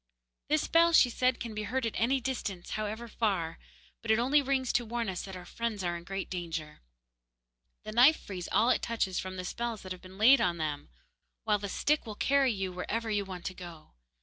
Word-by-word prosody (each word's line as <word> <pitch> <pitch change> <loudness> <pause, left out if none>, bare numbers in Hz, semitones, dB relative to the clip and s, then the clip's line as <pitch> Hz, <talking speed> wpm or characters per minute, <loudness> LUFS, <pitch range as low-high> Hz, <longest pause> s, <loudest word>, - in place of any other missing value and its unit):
'This 305 0 +2
bell,' 335 0 +5
she 250 -6 +6
said, 255 +1 +1
'can 230 -2 -5
be 215 - -3
heard 240 +4 -1
at 225 - -2
any 260 +4 +2
distance, 225 -8 -4
however 215 +2 -3
far, 195 -8 -1 0.4
but 230 - -8
it 220 - +5
only 270 +5 +4
rings 265 -2 0
to 240 - +2
warn 235 0 -3
us 185 -2 -3
that 190 -1 -8
our 180 -1 -9
friends 225 -1 -3
are 175 -1 -1
in 170 - -7
great 195 +2 -4
danger. 165 -4 -5 1.0
The 215 - -6
knife 250 +8 +6
frees 180 -3 -7
all 235 +3 +4
it - - +2
touches 215 -5 -1
from 185 0 -5
the 185 -1 -5
spells 235 +2 -4
that 185 - -8
have 185 - -6
been 185 +1 -13
laid 250 +6 +7
on 175 -1 +1
them; 150 -2 -3 0.5
while 210 -2 +2
the 200 0 -5
stick 295 +5 +1
will 215 - -5
carry 275 +2 +3
you 195 -3 -3
wherever 220 +5 -3
you 205 -1 0
want 185 -2 -8
to 185 - -3
go. 175 -4 -11
215 Hz, 220 wpm, -30 LUFS, 185-240 Hz, 1.0 s, laid